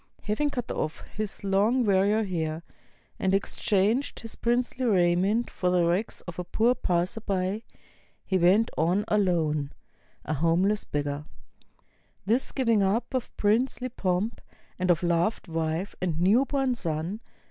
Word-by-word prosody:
Having 215 Hz, +8 st, 0 dB
cut 245 Hz, -4 st, -4 dB
off 155 Hz, -, -3 dB
his 215 Hz, -1 st, -4 dB
long 210 Hz, +6 st, +2 dB
warrior 205 Hz, +2 st, +3 dB
hair, 165 Hz, -4 st, -3 dB, 0.6 s
and 190 Hz, 0 st, +2 dB
exchanged 205 Hz, +5 st, 0 dB
his 225 Hz, -1 st, -8 dB
princely 245 Hz, +2 st, 0 dB
raiment 195 Hz, +1 st, +2 dB
for 180 Hz, -, -1 dB
the 180 Hz, -1 st, +3 dB
rags 180 Hz, +6 st, -1 dB
of 175 Hz, 0 st, -8 dB
a -, -, -2 dB
poor 225 Hz, +7 st, +2 dB
passer 185 Hz, -1 st, -1 dB
by, 195 Hz, 0 st, -1 dB, 0.6 s
he 190 Hz, -1 st, +1 dB
went 195 Hz, +6 st, +4 dB
on 180 Hz, +6 st, +1 dB
alone, 160 Hz, -8 st, +1 dB, 0.5 s
a 155 Hz, -, -1 dB
homeless 170 Hz, +7 st, +2 dB
27 -, -, -3 dB
INDIA 145 Hz, 0 st, -2 dB
beggar. -, -, -23 dB, 1.0 s
This 230 Hz, +6 st, +1 dB
gi\'ing 230 Hz, -6 st, +2 dB
up 200 Hz, +7 st, 0 dB
of 255 Hz, -2 st, -3 dB
princely 245 Hz, +4 st, +1 dB
pomp, 195 Hz, 0 st, -1 dB, 0.4 s
and 185 Hz, 0 st, 0 dB
of 175 Hz, 0 st, +3 dB
loved 175 Hz, +5 st, +1 dB
wife 165 Hz, +3 st, -2 dB
and 170 Hz, -3 st, -1 dB
new 210 Hz, +10 st, +4 dB
born 270 Hz, -2 st, 0 dB
son. 170 Hz, -1 st, -3 dB
195 Hz, 145 wpm, -27 LUFS, 175-225 Hz, 1.0 s, went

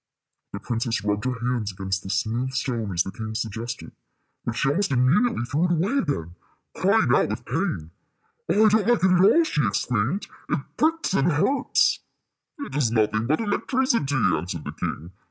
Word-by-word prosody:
The 100 Hz, -, -5 dB
princess 115 Hz, -1 st, -2 dB
rubbed 105 Hz, +2 st, -1 dB
her 125 Hz, -2 st, -2 dB
hands 120 Hz, -5 st, -1 dB
against 95 Hz, +1 st, -3 dB
the 95 Hz, -, -9 dB
smooth 115 Hz, +7 st, -1 dB
stone 115 Hz, -6 st, -2 dB
as 90 Hz, 0 st, +1 dB
the 95 Hz, -, -6 dB
king 110 Hz, +1 st, -6 dB
suggested; 115 Hz, +2 st, -5 dB, 0.5 s
but 120 Hz, -, -2 dB
she 135 Hz, -, +1 dB
almost 180 Hz, +8 st, +1 dB
immediately 135 Hz, -, +2 dB
threw 145 Hz, +7 st, 0 dB
it 175 Hz, -, 0 dB
away 190 Hz, -, +1 dB
again, 85 Hz, -, -2 dB, 0.4 s
crying -, -, +3 dB
out -, -, +3 dB
with -, -, -5 dB
pain. 80 Hz, +1 st, -2 dB, 0.6 s
"Oh, 215 Hz, +2 st, +4 dB
I -, -, +7 dB
don't 215 Hz, -1 st, +2 dB
like 240 Hz, -5 st, +3 dB
it 190 Hz, -, +5 dB
at 180 Hz, -1 st, +4 dB
all," 320 Hz, -, +6 dB
she 150 Hz, -, 0 dB
exclaimed. 115 Hz, -, 0 dB, 0.2 s
"It -, -, +1 dB, 0.2 s
pricks 320 Hz, -, +1 dB
and 170 Hz, -1 st, +3 dB
hurts." 265 Hz, -, +2 dB, 0.6 s
"It 285 Hz, -1 st, -7 dB
is 145 Hz, -6 st, +2 dB
nothing 110 Hz, 0 st, +1 dB
but 155 Hz, +4 st, +2 dB
the -, -, -3 dB
electricity," 230 Hz, -, 0 dB
answered 90 Hz, -7 st, 0 dB
the -, -, -5 dB
king. 85 Hz, +4 st, -5 dB
125 Hz, 185 wpm, -24 LUFS, -, 0.6 s, I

